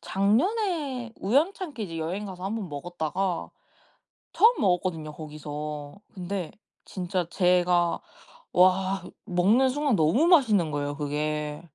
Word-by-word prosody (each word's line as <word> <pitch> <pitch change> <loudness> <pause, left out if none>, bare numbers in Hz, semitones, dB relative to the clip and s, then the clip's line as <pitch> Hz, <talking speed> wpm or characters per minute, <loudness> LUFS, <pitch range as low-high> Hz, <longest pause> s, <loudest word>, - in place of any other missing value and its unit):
작년에 270 - 0
우연찮게 290 - 0
이제 165 -4 -6
여행 180 +6 -3
가서 185 -1 -8
1 200 +3 -2
번 205 -5 -5
먹었다가 175 +4 -3 0.8
처음 460 +3 +5
먹었거든요 180 -5 0
거기서. 150 +1 -7
근데 185 -2 -4 0.3
진짜 180 -1 -3
제가 180 -2 +2 0.5
와 185 +1 +3 0.2
먹는 210 +8 +3
순간 285 -1 +1
너무 175 - +3
맛있는 220 - +4
거예요 145 0 -2
그게. 150 0 -2
185 Hz, 250 characters per minute, -26 LUFS, 160-225 Hz, 0.8 s, 처음